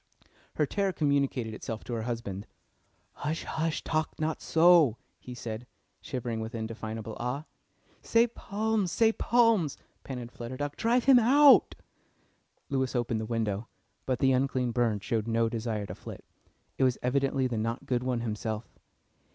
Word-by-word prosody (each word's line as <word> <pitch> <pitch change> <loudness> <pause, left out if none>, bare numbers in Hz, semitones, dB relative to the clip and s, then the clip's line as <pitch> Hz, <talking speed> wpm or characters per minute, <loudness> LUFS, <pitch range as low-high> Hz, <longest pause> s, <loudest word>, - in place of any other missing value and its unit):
Her 150 - +2
terror 195 +6 0
communicated 140 -7 0
itself 110 0 -6
to 120 - -6
her 115 - -2
husband. 110 -4 -4 0.7
"Hush, 155 +2 -3
hush! 160 -1 -2
Talk 155 -1 -2
not 155 0 -1
so," 165 -7 +5 0.2
he 125 - -9
said, 115 0 -6 0.3
shivering 120 -3 -4
with 110 +2 -5
indefinable 110 -1 -5
awe. 125 +5 -3 0.6
"Say 230 +1 +3
psalms, 210 -2 -1
say 225 +3 +3
psalms!" 230 - +3 0.3
panted 125 -3 -6
Flutter 120 +2 -7
Duck. 145 +1 -3
"Drive 235 +2 +2
him 265 -2 +7
out." 275 +5 +6 0.9
Lewis 130 -2 -1
opened 120 -2 0
the 110 - -4
window, 110 -2 -2 0.4
but 130 -1 +1
the 135 +2 +3
unclean 130 -1 +1
bird 115 -4 0
showed 115 -4 -1
no 115 0 +2
desire 110 -2 -3
to - - -7
flit. - - -10 0.5
It - - +3
was 130 -2 +3
evidently 135 +1 +1
the 120 -3 -1
Not 115 +3 -3
Good 125 -2 0
One 125 -2 -1
himself. 110 0 -4
125 Hz, 150 wpm, -29 LUFS, 115-155 Hz, 0.9 s, him